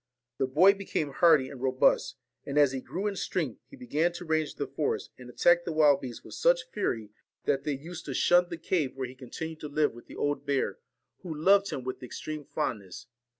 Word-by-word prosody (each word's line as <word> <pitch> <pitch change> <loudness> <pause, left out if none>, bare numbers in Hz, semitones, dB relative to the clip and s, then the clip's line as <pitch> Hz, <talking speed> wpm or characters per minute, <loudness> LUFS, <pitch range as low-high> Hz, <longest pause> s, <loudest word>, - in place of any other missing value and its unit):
The 135 - +2
boy 175 +9 +6
became 190 -7 -3
hardy 155 -2 +5
and 135 -3 -10
robust; 130 -1 +2 0.3
and 140 +1 -4
as 145 -3 +6
he 135 -1 -4
grew 175 +12 -5
in 205 -1 -1
strength 160 - -2
he - - -12
began 175 - 0
to 175 +1 -7
range 155 -1 0
the - - -2
forest, - - -2
and 125 -1 -10
attack 175 +7 +4
the 170 - -3
wild 150 -3 +4
beasts 125 -3 -7
with - - -11
such - - +2
fury 110 - -2 0.3
that 135 -2 0
they 150 - 0
38 135 - -11
used 175 0 -8
to 135 - -4
shun 175 +5 +4
the 170 - -5
cave 160 -5 -1
where 130 -1 -3
he 125 - -10
continued 155 +5 -7
to 150 - -6
live 150 +1 +1
VALEN - - -18
with 120 - -14
the - - -11
old 145 0 -1
bear, 140 -2 -1 0.4
who 180 - -8
loved 195 +6 +4
him 130 - -4
with 130 0 -5
extreme 150 +4 -6
fondness. 100 -9 -4
150 Hz, 225 wpm, -29 LUFS, 130-175 Hz, 0.4 s, boy